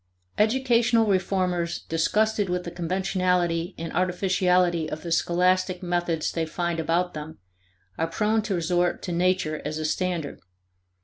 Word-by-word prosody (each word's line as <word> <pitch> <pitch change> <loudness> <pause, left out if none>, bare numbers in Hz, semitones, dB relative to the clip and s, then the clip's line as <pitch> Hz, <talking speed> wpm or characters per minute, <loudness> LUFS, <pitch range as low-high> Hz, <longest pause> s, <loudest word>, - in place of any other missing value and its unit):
(1) 210 - +5
Educational 235 -2 +2
reformers 185 -3 0
disgusted 205 +5 +1
with 180 0 -1
the 170 - -6
conventionality 180 -1 0
and 165 0 -5
artificiality 180 -2 +1
of 155 - -6
the 170 - -5
scholastic 180 +2 +1
methods 175 -2 -1
they 165 - -1
find 170 +1 -2
about 170 +3 0
them 155 +1 -7 0.6
are 165 - +1
prone 215 +5 +1
to 205 -2 -2
resort 175 +1 0
to 180 - -4
nature 175 -3 0
as 155 +1 -3
a 155 - -3
standard. 170 -2 -2
180 Hz, 140 wpm, -25 LUFS, 165-185 Hz, 0.6 s, 1